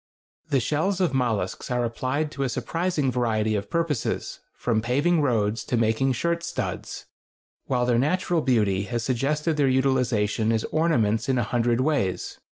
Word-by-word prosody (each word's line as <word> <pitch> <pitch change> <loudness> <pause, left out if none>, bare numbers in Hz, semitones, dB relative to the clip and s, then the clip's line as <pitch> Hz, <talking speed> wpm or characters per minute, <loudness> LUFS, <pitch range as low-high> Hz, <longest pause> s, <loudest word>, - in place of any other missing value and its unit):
The 140 -3 +3
shells 155 +9 0
of 180 -7 +1
mollusks 115 -8 -1
are 125 -1 0
applied 130 +6 -2
to 140 - -6
a 135 - +1
surprising 150 +3 -1
variety 110 -3 0
of 100 -1 -2
purposes, 165 -7 -2 0.2
from 115 -3 0
paving 145 +8 +2
roads 115 -5 +1
to 125 - 0
making 115 +4 +2
shirt 170 +6 -1
studs, 170 0 -5 0.6
while 125 -2 0
their 120 -1 +2
natural 175 +4 +1
beauty 105 -8 +1
has 120 +1 -3
suggested 150 +6 0
their 145 -2 +3
utilization 125 -5 +1
as 110 -1 0
ornaments 120 -9 +1
in 130 - +2
a 120 - +2
hundred 120 +2 +1
ways. 130 -10 -1
125 Hz, 155 wpm, -25 LUFS, 115-150 Hz, 0.6 s, The